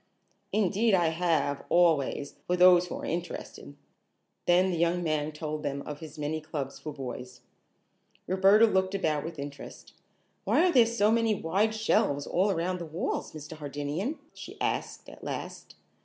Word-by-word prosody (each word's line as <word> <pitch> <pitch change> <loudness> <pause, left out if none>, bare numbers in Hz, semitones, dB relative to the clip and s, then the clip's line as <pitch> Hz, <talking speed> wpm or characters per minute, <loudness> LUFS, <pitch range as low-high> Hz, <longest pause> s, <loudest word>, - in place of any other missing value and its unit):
"Indeed 210 +1 +2
I 170 -3 +3
have, 160 -4 0
always, 160 -5 +2
for 180 - +1
those 180 0 +6
who - - -5
are - - -6
interested." 165 - -5 0.7
Then 180 +2 +4
the 175 - -1
young 170 +1 +1
man 155 -2 -1
told 155 0 -5
them 140 -1 -3
of 150 -1 -7
his 155 -2 -10
many 150 +1 -2
clubs 145 -3 -5
for 155 - -6
boys. 125 -3 -7 0.8
Roberta 195 +4 +5
looked 190 -2 +1
about 155 -6 0
with 165 0 -7
interest. 140 0 -9 0.5
"Why 360 - +3
are - - +3
there 245 -7 +6
so 220 -2 +2
many 225 -1 +2
wide 200 +6 0
shelves 145 -10 +1
all 190 +4 +1
around 180 0 -1
the 170 - -5
walls, 160 +4 -3
Mr. 155 0 -8
Hardinian?" 150 - -3 0.2
she - - -10
asked - - -2
at - - -13
last. - - -6
170 Hz, 160 wpm, -28 LUFS, 150-190 Hz, 0.8 s, those